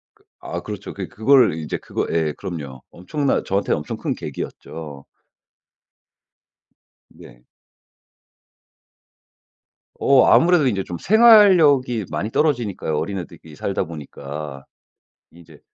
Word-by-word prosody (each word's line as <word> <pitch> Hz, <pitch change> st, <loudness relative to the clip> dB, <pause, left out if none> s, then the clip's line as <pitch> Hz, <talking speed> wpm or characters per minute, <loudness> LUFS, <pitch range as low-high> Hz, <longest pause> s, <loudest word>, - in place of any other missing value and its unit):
그 -, -, -31 dB, 0.2 s
아 -, -, -5 dB
그렇죠. 105 Hz, -1 st, -8 dB
그래 95 Hz, -2 st, -6 dB
그걸 130 Hz, +4 st, +4 dB
인제 80 Hz, -1 st, -4 dB
그거 -, -, -4 dB
예. 80 Hz, -2 st, 0 dB
그럼요. 75 Hz, -9 st, -7 dB
엄청난, 140 Hz, -, -2 dB
저한테는 100 Hz, -4 st, 0 dB
엄청 75 Hz, -, -6 dB
큰 -, -, -3 dB
계기였죠. 75 Hz, -4 st, -8 dB, 2.1 s
네. -, -, -16 dB, 2.5 s
어 135 Hz, -2 st, +4 dB
아무래도 170 Hz, -3 st, +4 dB
인제 100 Hz, -6 st, 0 dB
좀 90 Hz, -, -6 dB
생활력이 180 Hz, -, +5 dB
많이 105 Hz, -, -3 dB
떨어지니까요 115 Hz, -, -1 dB
어린애들끼리 85 Hz, -5 st, -7 dB
살다 95 Hz, +3 st, -2 dB
보니까. 75 Hz, -3 st, -8 dB, 0.7 s
이제 80 Hz, -3 st, -17 dB
95 Hz, 250 characters per minute, -21 LUFS, -, 2.5 s, 생활력이